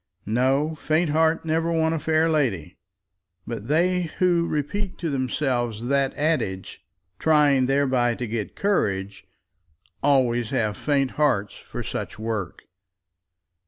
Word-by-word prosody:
No; 135 +7 +1
faint 155 +1 0
heart 160 +1 +2
never 165 +1 0
won 160 -1 +1
a 165 - -1
fair 160 +2 +2
lady; 110 - 0 0.7
but 115 -2 -6
they 175 +3 +1
who 175 -2 +2
repeat 180 +6 -3
to 165 -3 -3
themselves 125 -4 -1
that 140 -1 +2
adage, 145 -12 -2 0.4
trying 145 -4 +4
thereby 130 -3 +2
to 125 - -4
get 110 -2 -4
courage, 100 - -1 0.7
always 120 -5 +2
have 110 -6 0
faint 140 0 0
hearts 105 -9 +2
for - - -7
such - - -5
work. 110 -5 -4
140 Hz, 125 wpm, -24 LUFS, 115-160 Hz, 0.7 s, trying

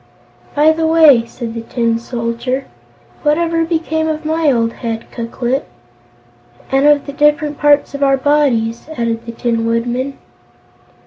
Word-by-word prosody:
"By 300 +2 +5
the 320 0 0
way," 305 -8 +5
said 235 -1 -7
the 230 - -5
Tin 230 0 -1
Soldier, 235 +2 -3 0.6
"what 300 0 +2
ever 335 -1 0
became 320 -1 -1
of 310 0 -3
my 315 -1 +2
old 230 -2 0
head, 230 -2 -5
Ku 235 -1 -5
Klip?" 250 +3 -2 1.0
"And 270 +2 +3
of 295 -1 +4
the 280 - -7
different 295 0 +1
parts 290 -1 +3
of 280 - -6
our 275 -1 +3
bodies?" 260 -4 +1
added 230 0 -2
the - - -4
Tin 230 -1 -1
Woodman. 240 +4 -1
270 Hz, 150 wpm, -16 LUFS, 235-300 Hz, 1.0 s, By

